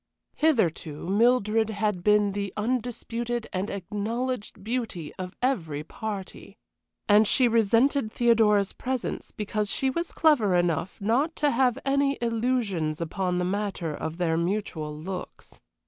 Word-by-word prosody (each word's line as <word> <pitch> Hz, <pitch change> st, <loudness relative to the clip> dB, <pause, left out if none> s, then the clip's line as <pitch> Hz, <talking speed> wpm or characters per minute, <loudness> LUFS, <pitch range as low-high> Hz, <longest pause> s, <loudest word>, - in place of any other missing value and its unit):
Hitherto 175 Hz, -, 0 dB
Mildred 220 Hz, +1 st, +3 dB
had 210 Hz, -4 st, -1 dB
been 210 Hz, 0 st, +4 dB
the 200 Hz, -1 st, -3 dB
undisputed 240 Hz, 0 st, -2 dB
and 190 Hz, +2 st, -2 dB
acknowledged 210 Hz, +3 st, -4 dB
beauty 220 Hz, -9 st, -3 dB
of 185 Hz, 0 st, -6 dB
every 165 Hz, -, 0 dB
party, 200 Hz, +3 st, -7 dB, 0.5 s
and 210 Hz, +1 st, +6 dB
she 255 Hz, +2 st, +4 dB
resented 230 Hz, +2 st, +3 dB
Theodora's 220 Hz, -5 st, +3 dB
presence 260 Hz, -2 st, -4 dB
because 210 Hz, 0 st, -2 dB
she 265 Hz, +5 st, +2 dB
was 335 Hz, +5 st, -3 dB
clever 245 Hz, -, +3 dB
enough 175 Hz, -1 st, 0 dB
not 255 Hz, +11 st, +1 dB
to 290 Hz, -1 st, +2 dB
have 250 Hz, -1 st, +2 dB
any 275 Hz, 0 st, +2 dB
illusions 225 Hz, -9 st, 0 dB
upon 180 Hz, +2 st, -1 dB
the 180 Hz, -, 0 dB
matter 195 Hz, -4 st, -2 dB
of 160 Hz, +2 st, -5 dB
their 165 Hz, -2 st, +1 dB
mutual 170 Hz, -4 st, -2 dB
looks. 180 Hz, +4 st, -8 dB
210 Hz, 130 wpm, -26 LUFS, 185-240 Hz, 0.5 s, and